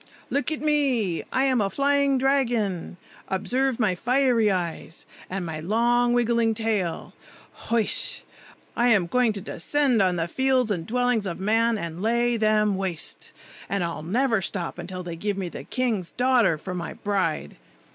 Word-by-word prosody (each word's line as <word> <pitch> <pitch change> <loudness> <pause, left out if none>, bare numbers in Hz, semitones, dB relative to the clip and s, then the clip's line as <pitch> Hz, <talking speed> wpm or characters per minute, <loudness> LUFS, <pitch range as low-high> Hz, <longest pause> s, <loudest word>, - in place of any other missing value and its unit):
Look 285 +2 0
at 310 - -2
me! 265 - +1
I 260 - +2
am 260 -4 +2
a 200 - +1
flying 280 +2 +2
dragon! 240 -10 0 0.3
Observe 245 +7 0
my 215 -5 +2
fiery 245 +1 +2
eyes, 175 -3 -3 0.2
and 190 -1 -3
my 160 -2 -5
long 240 +7 +2
wiggling 235 -2 +2
tail! 210 -6 -2 0.6
Hoish! 230 -2 -1 0.5
I 240 - +2
am 205 -7 +4
going 245 +5 +2
to 200 - -5
descend 255 - +1
on 185 -2 +2
the 165 -1 -1
fields 260 +2 +1
and 170 -5 -2
dwellings 245 -3 +1
of 170 -1 -4
men, 225 +3 +2
and 170 -2 -5
lay 235 +2 +2
them 215 -2 +2
waste; 185 -4 -4 0.4
and 200 -2 0
I'll 170 -2 -4
never 225 - +1
stop 185 -2 -3
till 185 -1 -5
they 170 -1 -6
give 200 +3 -3
me 185 -3 -3
the - - -8
king's 225 -9 -1
daughter 245 -9 +2
for 185 +4 -6
my 175 -1 -5
bride. 185 - -2
220 Hz, 160 wpm, -25 LUFS, 185-245 Hz, 0.6 s, am